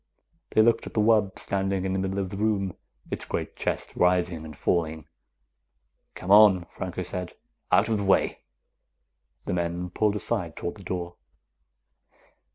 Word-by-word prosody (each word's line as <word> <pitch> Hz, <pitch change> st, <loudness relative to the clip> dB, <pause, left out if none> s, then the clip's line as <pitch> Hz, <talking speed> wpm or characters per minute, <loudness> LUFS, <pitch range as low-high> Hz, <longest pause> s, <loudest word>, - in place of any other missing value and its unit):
They 110 Hz, -, +4 dB
looked 115 Hz, +1 st, +2 dB
at -, -, -10 dB
the -, -, +2 dB
wub, 105 Hz, -3 st, +3 dB
standing 95 Hz, -1 st, -1 dB
in 95 Hz, -, -1 dB
the 95 Hz, -, 0 dB
middle 95 Hz, +1 st, -2 dB
of 95 Hz, -2 st, -2 dB
the 100 Hz, -, -5 dB
room, 100 Hz, -4 st, 0 dB, 0.4 s
its -, -, -3 dB
great -, -, -4 dB
chest -, -, -3 dB
rising 90 Hz, -2 st, +2 dB
and 80 Hz, -1 st, -9 dB
falling. 80 Hz, -3 st, 0 dB, 1.1 s
"Come 90 Hz, -, -4 dB
on," 100 Hz, -4 st, +7 dB
Franco 95 Hz, 0 st, -4 dB
said. 90 Hz, 0 st, -5 dB, 0.4 s
"Out 100 Hz, +3 st, +5 dB
of 110 Hz, -2 st, +1 dB
the -, -, -2 dB
way." 95 Hz, -, +2 dB, 1.1 s
The -, -, -2 dB
men 85 Hz, 0 st, -2 dB
pulled 105 Hz, +2 st, +1 dB
aside 100 Hz, -6 st, -1 dB
toward 85 Hz, -, -4 dB
the 100 Hz, -, -12 dB
door. 90 Hz, -1 st, -4 dB
95 Hz, 160 wpm, -26 LUFS, 90-100 Hz, 1.1 s, on